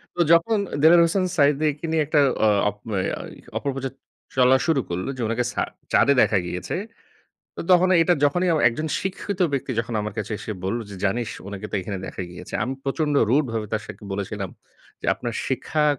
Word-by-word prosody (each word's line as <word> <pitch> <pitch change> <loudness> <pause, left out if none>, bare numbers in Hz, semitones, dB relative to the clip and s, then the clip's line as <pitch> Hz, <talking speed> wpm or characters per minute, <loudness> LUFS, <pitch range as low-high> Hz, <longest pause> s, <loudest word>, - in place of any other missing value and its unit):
তো 175 - +1
যখন, 170 +7 +4 0.2
দেলোয়ার 170 +2 +7
হোসেন 185 +2 +1
সাঈদীকে 145 +2 +2
নিয়ে 160 -1 +2
একটা 150 -1 +3 0.3
অ - - +6 0.2
অপ 105 - -10 0.2
অ্যা 95 -1 -1 0.4
অপপ্রচার 135 -1 -3 0.4
চলা 130 +1 +5
শুরু 150 -5 +3
করল, 90 +5 -3
যে - - -4
উনাকে 115 +2 0
ছা - - 0 0.3
চাঁদে 140 - +5
দেখা 105 - +3
গিয়েছে। 90 0 -4 0.8
তো - - -5
তখন 180 +1 +5
এটা 175 +1 +3
যখনই 175 +5 +2
অ - - +2
একজন 155 +7 -3
শিক্ষিত 190 0 -4
ব্যক্তি 135 -1 -2
যখন 115 0 -6
আমার 105 0 -4
কাছে 105 +1 -3
এসে 110 - -5
বলল, 100 +5 -1
যে - - -7
"জানিস 115 +4 0 0.2
উনাকে 100 +1 -6
তো - - -2
এখানে 95 +1 -5
দেখা - - -5
গিয়েছে।" 90 - -10
আমি 130 +1 -3
প্রচন্ড 150 +1 0 0.2
রুড 145 +3 +4
ভাবে 110 -2 -2
তার 110 -1 0
সাথে - - -10
বলেছিলাম 100 -1 -4 0.5
যে - - -6
"আপনার 120 -2 -5
শিক্ষা 150 +3 0
135 Hz, 190 wpm, -23 LUFS, 105-155 Hz, 0.8 s, দেলোয়ার